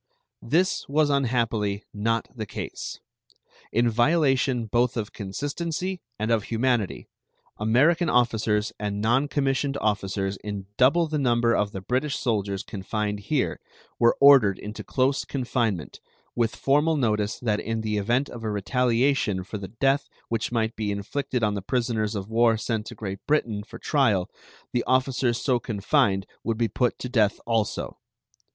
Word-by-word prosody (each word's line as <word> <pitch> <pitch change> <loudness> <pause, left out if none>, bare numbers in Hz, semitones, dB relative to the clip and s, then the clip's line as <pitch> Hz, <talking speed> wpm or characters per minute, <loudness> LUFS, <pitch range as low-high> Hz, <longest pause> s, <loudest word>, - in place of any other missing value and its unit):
This 175 +9 +1
was 150 +1 +3
unhappily 115 -6 0
not 115 +2 0
the 110 -3 -5
case. - - -6 0.7
In 120 +2 +2
violation 130 0 +2
both 120 +3 +1
of 110 -2 -3
consistency 160 - -3 0.2
and 110 +2 -1
of 110 -3 +2
humanity, 115 -3 0 0.5
American 150 +11 +3
officers 110 -3 +1
and 105 -1 -2
non 120 +7 +2
commissioned 140 -1 0
officers 100 -2 -1
in 100 -1 -6
double 140 +9 +4
the 155 -1 -2
number 120 -3 +2
of 100 0 0
the 95 - -6
British 130 +8 -1
soldiers 100 -5 -1
confined 105 0 -3
here 130 +7 -1 0.4
were 120 0 +4
ordered 135 -9 +7
into 105 +2 -7
close 135 +1 +1
confinement, 120 - -2 0.4
with 115 -2 0
formal 150 +3 +2
notice 105 -5 0
that 110 -4 0
in 115 0 -2
the 105 -1 -1
event 120 +7 +1
of 120 -1 -9
a 110 - -1
retaliation 115 -1 +1
for 100 +3 -6
the 95 - -6
death 135 +6 0 0.2
which 115 0 -1
might 110 -1 0
be 105 -2 -2
inflicted 115 +5 -2
on 105 -1 +2
the 100 - -3
prisoners 115 -1 -1
of 100 -1 -4
war 115 0 +3
sent 110 -1 -2
to - - -8
Great 100 -2 -5
Britain 120 -9 +1
for 105 - -11
trial 110 -11 +1 0.4
the 120 - +1
officers 130 -2 +1
so 125 -3 +1
confined 105 -2 +1 0.2
would 115 -1 -1
be 115 0 +2
put 125 +1 0
to - - -5
death 110 -4 +2
also. 115 -3 -1
115 Hz, 155 wpm, -25 LUFS, 105-130 Hz, 0.7 s, ordered